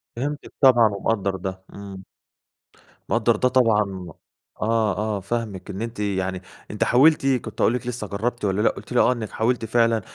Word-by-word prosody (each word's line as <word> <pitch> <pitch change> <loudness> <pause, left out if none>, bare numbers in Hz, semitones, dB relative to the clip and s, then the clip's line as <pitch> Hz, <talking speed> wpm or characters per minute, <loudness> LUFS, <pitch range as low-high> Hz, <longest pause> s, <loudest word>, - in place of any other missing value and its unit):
فهمتِك 145 +5 -4
طبعًا 120 -4 +7
ومقدّر 100 -1 -1
ده، 95 0 -6
إمم. 100 -1 -9 1.1
مقدّر 115 0 +2
ده 125 - +2
طبعًا 105 -7 +1 0.5
آه، 110 -3 +1
آه، 105 -1 -1
فاهمِك. 105 -1 -4
إن 100 +1 -5
أنتِ 115 -1 -5
يعني 95 -2 -2 0.3
أنتِ 105 - 0
حاولتِ 140 +4 +4
كُنت 130 -3 -1
هاقول 115 - +4
لك 125 0 -4
لسه 120 -3 -4
جرّبتِ 110 +3 -3
والا 95 +1 0
لأ، - - +4
قُلتِ - - -9
لي 125 - +3
آه، - - +5
إنِّك 115 -3 -6
حاولتِ 115 +1 0
فعلًا 115 0 +2
110 Hz, 170 wpm, -23 LUFS, 100-120 Hz, 1.1 s, طبعًا